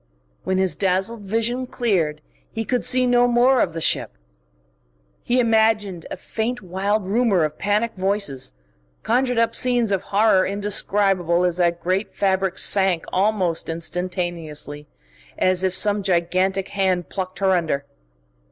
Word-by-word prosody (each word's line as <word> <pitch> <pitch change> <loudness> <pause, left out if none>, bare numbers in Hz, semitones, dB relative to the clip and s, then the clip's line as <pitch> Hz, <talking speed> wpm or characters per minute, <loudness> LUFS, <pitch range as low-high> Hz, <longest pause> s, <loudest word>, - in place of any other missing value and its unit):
When 190 - -1
his 190 -1 +2
dazzled 195 +4 -1
vision 230 +5 -2
cleared, 170 -12 -1 0.3
he 225 0 -4
could 250 +1 -1
see 255 0 +2
no 245 0 +4
more 245 +2 +3
of 170 - 0
the 165 - -4
ship. - - 0 1.1
He 250 +1 0
imagined 220 -6 +1
a - - -6
faint, 225 +4 -4
wild 195 +3 -1
rumour 205 -3 +2
of 155 0 -3
panic 210 +3 0
voices, 190 - -2 0.5
conjured 245 +1 +1
up 230 0 +2
scenes 240 -3 +2
of 195 -2 0
horror 200 -1 +3
indescribable 195 -3 +1
as 175 -1 0
that 170 -1 0
great 190 +3 -1
fabric 190 -1 0
sank 190 -4 +3
almost 185 -5 0
instantaneously, 165 -3 -4 0.5
as 185 0 +1
if 185 -1 0
some 205 +1 +2
gigantic 185 +1 0
hand 185 -4 -1
plucked 185 -1 -5
her 195 -1 +1
under. 160 -6 0
195 Hz, 140 wpm, -22 LUFS, 180-220 Hz, 1.1 s, no